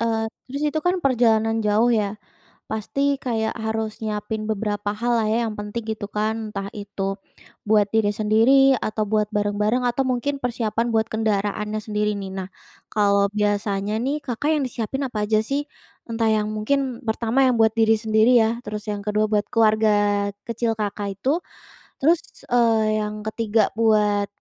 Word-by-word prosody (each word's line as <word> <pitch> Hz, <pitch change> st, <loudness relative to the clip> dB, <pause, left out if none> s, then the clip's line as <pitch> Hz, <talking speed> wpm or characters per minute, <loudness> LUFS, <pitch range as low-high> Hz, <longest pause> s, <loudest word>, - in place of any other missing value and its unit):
Eee, 225 Hz, -1 st, 0 dB, 0.2 s
terus 280 Hz, +3 st, -4 dB
itu 310 Hz, +1 st, 0 dB
kan 360 Hz, -, +3 dB
perjalanan 225 Hz, -3 st, +3 dB
jauh, 215 Hz, +3 st, +3 dB
ya. 210 Hz, -1 st, -1 dB, 0.5 s
Pasti 275 Hz, +6 st, -1 dB
kayak, 220 Hz, -3 st, -1 dB
harus 220 Hz, 0 st, -3 dB
nyiapin 215 Hz, 0 st, -3 dB
beberapa 205 Hz, -1 st, -2 dB
hal, 240 Hz, +2 st, 0 dB
lah 215 Hz, -, 0 dB
ya, 225 Hz, -, +2 dB
yang 215 Hz, -, -4 dB
penting, 210 Hz, +2 st, -5 dB
gitu 205 Hz, -2 st, -5 dB
kan. 220 Hz, +1 st, -2 dB
Entah 200 Hz, -1 st, -4 dB
itu 205 Hz, -1 st, -6 dB, 0.7 s
buat 210 Hz, -2 st, +4 dB
diri 215 Hz, -2 st, +3 dB
sendiri, 230 Hz, +6 st, +4 dB
atau 215 Hz, 0 st, -1 dB
buat 210 Hz, 0 st, +1 dB
bareng-bareng, 210 Hz, +4 st, +1 dB
atau 245 Hz, +3 st, +1 dB
mungkin 275 Hz, +3 st, -1 dB
persiapan 230 Hz, -1 st, -1 dB
buat 220 Hz, 0 st, +2 dB
kendaraannya 210 Hz, 0 st, -1 dB
sendiri, 210 Hz, -1 st, 0 dB
nih. 195 Hz, -1 st, -6 dB
Nah, 190 Hz, 0 st, -5 dB, 0.4 s
kalau 200 Hz, -1 st, +3 dB
biasanya 205 Hz, 0 st, 0 dB
nih, 280 Hz, +3 st, 0 dB
Kakak 260 Hz, +4 st, -1 dB
yang 285 Hz, -, 0 dB
disiapin 245 Hz, +3 st, -4 dB
apa 210 Hz, -3 st, -2 dB
aja, 215 Hz, -, +3 dB
sih? 280 Hz, +5 st, -2 dB, 0.4 s
Entah 225 Hz, -1 st, 0 dB
yang 215 Hz, -1 st, +1 dB
mungkin, 255 Hz, +2 st, -1 dB
pertama 230 Hz, +4 st, +1 dB
yang 250 Hz, -2 st, +3 dB
buat 220 Hz, 0 st, +5 dB
diri 225 Hz, 0 st, +5 dB
sendiri, 220 Hz, +2 st, +3 dB
ya. 225 Hz, +2 st, 0 dB
Terus 210 Hz, +1 st, -6 dB
yang 205 Hz, -1 st, -4 dB
ke-2, 210 Hz, +1 st, +1 dB
buat 210 Hz, -1 st, +1 dB
keluarga 220 Hz, -1 st, +4 dB, 0.6 s
kecil 230 Hz, 0 st, 0 dB
Kakak 205 Hz, -1 st, -3 dB
itu, 280 Hz, +8 st, +1 dB, 0.6 s
terus, 325 Hz, +4 st, +4 dB, 0.3 s
eee, 225 Hz, -3 st, +3 dB
yang 210 Hz, 0 st, -5 dB
ke-3 220 Hz, -1 st, +1 dB
buat 210 Hz, -2 st, +3 dB
220 Hz, 160 wpm, -23 LUFS, 210-235 Hz, 0.7 s, buat